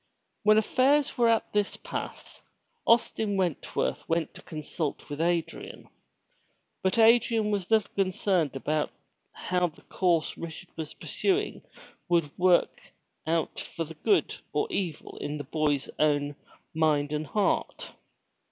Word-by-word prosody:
When 215 0 +5
affairs 275 +6 +3
were 235 -1 +4
at 225 -1 +1
this 205 -1 0
pass, - - -7 0.5
Austin 220 -3 +3
Wentworth 170 - -1
went 165 0 0
to - - -12
consult 155 -1 -4
with 145 +2 -3
Adrian. 170 -1 -2 0.9
But 190 +2 +1
Adrian 225 -1 +5
was 200 -3 -1
little 220 -2 +2
concerned 185 -5 +1
about 150 +3 0 0.4
how 180 0 0
the 160 - -15
course 170 -4 0
Richard 170 +2 -8
was 160 -2 -6
pursuing 395 +1 -1 0.5
would 170 -4 +1
work 180 -1 +3 0.5
out 165 -1 0
for 165 - -4
good 160 - +1 0.2
or - - +2
evil 175 - -3
in 150 +1 -3
the 145 - -5
boy's 145 -1 0
own 145 -1 +2 0.4
mind 150 -2 +2
and 150 0 -2
heart. 210 -2 0
175 Hz, 125 wpm, -28 LUFS, 155-210 Hz, 0.9 s, When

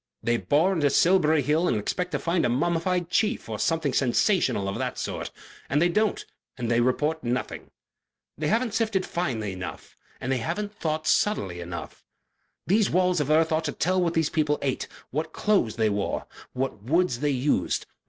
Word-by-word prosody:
"They 120 0 +2
bore 160 +10 +2
into 150 -5 +2
Silbury 160 -1 +4
Hill 155 +6 +2
and 115 - +1
expect 180 - -2
to - - +2
find 170 0 0
a - - +2
mummified 170 +7 0
chief 215 +3 +1
or - - -5
something 160 -5 0
sensational 130 - +2
of 95 - -3
that - - -3
sort, - - -4 0.4
and 145 - +2
they 175 +2 +3
don't, 215 +3 0 0.3
and 120 -2 -2
they 120 0 +3
report 150 +6 0
nothing. 125 +1 -3 0.7
They 155 - -2
haven't 230 +5 +1
sifted 220 -5 0
finely 120 - -2
enough; 90 -4 -8 0.2
they 130 +1 -1
haven't 205 - -3
thought 155 -5 -2
subtly 100 - +1
enough. 85 0 -7 0.6
These 205 +2 +3
walls 180 -2 +2
of 145 - -2
earth 160 +2 +3
ought 160 0 +1
to - - -2
tell 185 +2 +1
what 170 -1 0
these 160 -2 +1
people 150 -2 +1
ate, 135 -2 -1 0.2
what 155 +4 -3
clothes 200 - +1
they 110 -2 +2
wore, 100 -1 -2 0.3
what 130 -5 -3
woods 150 - +1
they 145 +1 +1
used. 140 +1 0
155 Hz, 180 wpm, -26 LUFS, 125-180 Hz, 0.7 s, Silbury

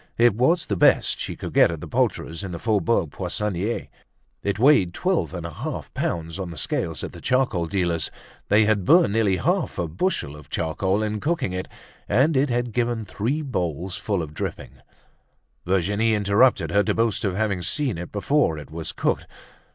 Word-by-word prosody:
It 120 -2 +5
was 145 - +2
the 100 - -1
best - - +3
she - - -4
could - - -7
get - - +6
at - - -4
the - - -8
poulterer's 80 +3 -1
in 95 -3 -5
the - - -4
Faubourg 105 -5 +1
Poissonniers; 105 +1 -2 0.5
it 100 0 -1
weighed 110 -8 +4
twelve 185 -1 0
and 85 -2 -6
a 85 - -6
half - - -6
pounds 85 +1 -3
on 95 -2 -4
the 85 - -9
scales - - -2
at - - -5
the - - -11
charcoal 125 -10 +1
dealer's; 85 -4 0 0.4
they 105 +1 +5
had 105 -2 +2
burnt 165 - +5
nearly 105 -4 +2
half - - 0
a 85 - -1
bushel 80 - -1
of 75 -1 -14
charcoal 95 +5 0
in 105 0 -2
cooking 145 - -1
it, 90 0 -3 0.4
and 145 +5 +3
it 135 +2 +2
had 120 -1 -1
given 120 -2 -1
three 120 +11 -2
bowls 90 - -3
full 100 -5 -1
of 75 -1 -8
drippings. - - -6 0.9
Virginie 100 +5 +2
interrupted 105 +5 +3
her 100 - +4
to - - 0
boast 115 -2 +1
of 95 -3 0
having 100 -3 0
seen 130 - -1
it 85 - -7
before 105 - +1
it 75 0 -10
was 80 0 -5
cooked. - - -1
100 Hz, 190 wpm, -24 LUFS, 85-120 Hz, 0.9 s, get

